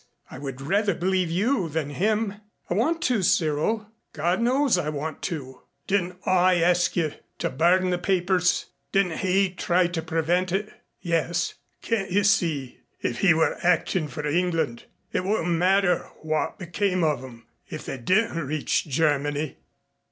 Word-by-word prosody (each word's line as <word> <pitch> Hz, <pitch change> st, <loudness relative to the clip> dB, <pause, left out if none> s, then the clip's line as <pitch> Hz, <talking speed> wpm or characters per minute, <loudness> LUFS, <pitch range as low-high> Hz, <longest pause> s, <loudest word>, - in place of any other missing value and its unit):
I 130 Hz, -, -8 dB
would 135 Hz, -2 st, -6 dB
rather 200 Hz, +6 st, +1 dB
believe 185 Hz, 0 st, 0 dB
you 190 Hz, +2 st, +1 dB
than 150 Hz, -1 st, -2 dB
him. 210 Hz, +4 st, 0 dB, 0.3 s
I -, -, +3 dB
want 315 Hz, -, +1 dB
to, 240 Hz, -5 st, +2 dB
Cyril. 195 Hz, +4 st, +1 dB, 0.2 s
God 175 Hz, +6 st, 0 dB
knows 260 Hz, +1 st, +3 dB
I 175 Hz, -4 st, -1 dB
want 155 Hz, +1 st, -4 dB
to." 130 Hz, -7 st, -7 dB, 0.2 s
"Didn't 185 Hz, -2 st, 0 dB
I 185 Hz, 0 st, +4 dB
ask 175 Hz, 0 st, +2 dB
you 160 Hz, -4 st, 0 dB, 0.2 s
to -, -, -2 dB
burn 180 Hz, +6 st, +3 dB
the 180 Hz, -, 0 dB
papers? 180 Hz, -1 st, +1 dB, 0.3 s
Didn't 180 Hz, -4 st, +1 dB
he 190 Hz, 0 st, +2 dB
try 180 Hz, 0 st, +2 dB
to 170 Hz, -1 st, -2 dB
prevent 165 Hz, +3 st, 0 dB
it?" 210 Hz, +3 st, -2 dB, 0.3 s
"Yes." 175 Hz, 0 st, 0 dB, 0.3 s
"Can't 205 Hz, -5 st, -1 dB
you 200 Hz, +3 st, +2 dB
see? 160 Hz, -, +1 dB, 0.2 s
If 120 Hz, -, -2 dB
he 180 Hz, -4 st, +5 dB
were 160 Hz, 0 st, +1 dB
acting 175 Hz, -1 st, +1 dB
for 150 Hz, +2 st, -6 dB
England, 165 Hz, -6 st, 0 dB, 0.3 s
it -, -, 0 dB
wouldn't 190 Hz, -3 st, 0 dB
matter 180 Hz, +1 st, +2 dB
what 155 Hz, 0 st, -1 dB
became 185 Hz, 0 st, -1 dB
of 150 Hz, -5 st, +1 dB
'em 120 Hz, -3 st, -12 dB, 0.2 s
if -, -, -7 dB
they 135 Hz, -, -5 dB
didn't 185 Hz, -, +1 dB
reach 150 Hz, 0 st, 0 dB
Germany." 145 Hz, 0 st, 0 dB
175 Hz, 155 wpm, -25 LUFS, 155-195 Hz, 0.3 s, he